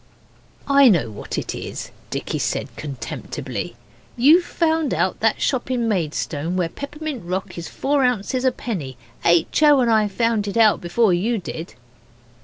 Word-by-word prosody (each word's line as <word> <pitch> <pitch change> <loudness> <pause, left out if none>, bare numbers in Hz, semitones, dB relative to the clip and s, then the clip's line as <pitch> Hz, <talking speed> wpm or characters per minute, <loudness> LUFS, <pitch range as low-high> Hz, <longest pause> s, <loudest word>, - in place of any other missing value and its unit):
'I 280 -2 +7
know 150 - +2
what 105 - -6
it - - -3
is,' - - -6 0.2
Dicky - - -3
said - - -2
contemptibly. 140 -5 -6 0.4
'You've 305 +9 +6
found 320 -3 0
out - - 0
that - - +2
shop 260 -2 0
in 245 -3 0
Maidstone 165 -3 -2
where 175 -2 0
peppermint 290 - -6
rock 185 +2 -4
is 170 -1 -6
four 280 0 0
ounces 250 +1 0
a 260 - +4
penny. 165 - -5 0.3
H. 170 - +3
O. 295 -2 +6
and 240 -2 +3
I 215 -1 +4
found 220 0 0
it 200 - -3
out 220 -2 +5
before 185 +3 +2
you 220 +7 +1
did. 165 - -7
225 Hz, 160 wpm, -22 LUFS, 175-265 Hz, 0.4 s, I